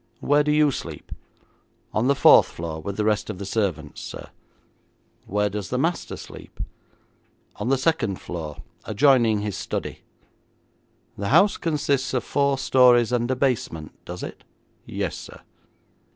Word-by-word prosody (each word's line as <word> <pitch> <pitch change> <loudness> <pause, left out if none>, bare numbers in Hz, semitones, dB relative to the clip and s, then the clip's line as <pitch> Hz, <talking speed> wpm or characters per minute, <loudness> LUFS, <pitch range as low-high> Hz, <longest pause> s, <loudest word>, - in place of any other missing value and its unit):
'Where 145 +1 +3
do 150 - +1
you 150 -1 +4
sleep?' - - -7 0.8
'On 110 +4 +1
the 140 - +4
fourth - - +7
floor 80 -1 -6
with 100 +4 -5
the 105 - 0
rest 105 0 +1
of 105 - -4
the 100 - -6
servants, 95 -8 -2
sir.' - - -8 1.0
'Where 105 +1 +1
does 100 -1 -5
the 125 - -1
master 165 +6 -1
sleep?' - - -12 1.0
'On - - -2
the 135 - +3
second 130 - 0
floor, 80 -4 -7 0.2
adjoining 115 -2 +3
his 105 -3 -3
study.' - - -4 1.2
'The 100 - -2
house 205 +1 +5
consists 140 -5 0
of 125 - 0
four 140 -1 +1
stories 125 -3 +5
and 120 -1 0
a 130 - +1
basement, 120 - -1
does 90 +1 -7
it?' - - -8 0.4
'Yes, - - -3
sir.' - - -11
120 Hz, 150 wpm, -24 LUFS, 100-140 Hz, 1.2 s, fourth